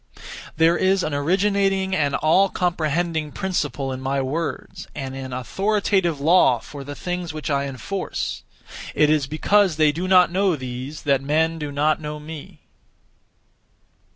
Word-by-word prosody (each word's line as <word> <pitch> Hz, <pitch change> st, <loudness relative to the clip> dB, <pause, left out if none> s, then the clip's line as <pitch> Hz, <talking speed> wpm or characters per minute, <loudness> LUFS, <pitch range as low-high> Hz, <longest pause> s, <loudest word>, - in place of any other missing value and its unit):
There 165 Hz, +2 st, +4 dB
is 190 Hz, 0 st, +2 dB
an 155 Hz, -, -2 dB
originating 190 Hz, +4 st, +1 dB
and 145 Hz, -4 st, +1 dB
all 190 Hz, +5 st, +3 dB
comprehending 165 Hz, -3 st, -1 dB
(principle) 145 Hz, -8 st, -2 dB
in 130 Hz, -, -6 dB
my 135 Hz, +1 st, -1 dB
words, 150 Hz, +5 st, -4 dB
and 135 Hz, -2 st, -5 dB
an 135 Hz, -1 st, -6 dB
authoritative 190 Hz, -, 0 dB
law 155 Hz, -4 st, +4 dB
for 140 Hz, +4 st, -10 dB
the 145 Hz, +1 st, -7 dB
things 180 Hz, -1 st, -4 dB
(which 155 Hz, 0 st, -4 dB
I 140 Hz, 0 st, +1 dB
enforce). 180 Hz, +9 st, -4 dB, 0.5 s
It 150 Hz, 0 st, +4 dB
is 150 Hz, -3 st, +1 dB
because 190 Hz, +4 st, +2 dB
they 155 Hz, -1 st, +4 dB
do 175 Hz, +5 st, -4 dB
not 180 Hz, -2 st, +5 dB
know 190 Hz, -1 st, +2 dB
these, 130 Hz, +2 st, -7 dB
that 140 Hz, -2 st, +2 dB
men 160 Hz, +3 st, +1 dB
do 150 Hz, -2 st, -4 dB
not 150 Hz, +2 st, +1 dB
know 150 Hz, 0 st, -5 dB
me. 150 Hz, 0 st, -10 dB
155 Hz, 150 wpm, -22 LUFS, 140-180 Hz, 0.5 s, not